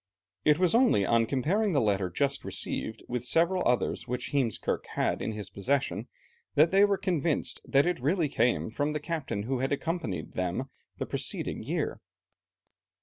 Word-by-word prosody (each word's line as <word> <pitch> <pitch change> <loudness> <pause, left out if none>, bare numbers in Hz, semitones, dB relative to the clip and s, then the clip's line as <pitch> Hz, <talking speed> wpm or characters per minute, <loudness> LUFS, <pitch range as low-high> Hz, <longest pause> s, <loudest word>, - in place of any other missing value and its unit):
It 150 -1 +5
was 180 0 +3
only 235 - +4
on 115 +2 +3
comparing 180 - +1
the 140 - +4
letter 100 -5 +1
just 140 +9 -1
received 110 +1 -3
with 125 -1 -3
several 170 +7 +2
others 125 0 0
which 125 +1 -3
Heemskerke 130 -7 0
had - - 0
in 110 - -2
his 105 -1 -7
possession, 120 -1 -1 0.5
that 155 +3 +5
they 195 +1 +6
were 200 -1 +3
convinced 170 -5 -1
that 140 +1 +3
it 175 -4 0
really 155 +5 +1
came 120 -4 +1
from 145 +5 -1
the 150 - -1
captain 150 -10 -3
who 130 +3 -1
had 135 +2 -1
accompanied 150 - -2
them 95 +9 -2 0.3
the - - -2
preceding - - -3
year. - - -2
140 Hz, 165 wpm, -29 LUFS, 115-165 Hz, 0.5 s, they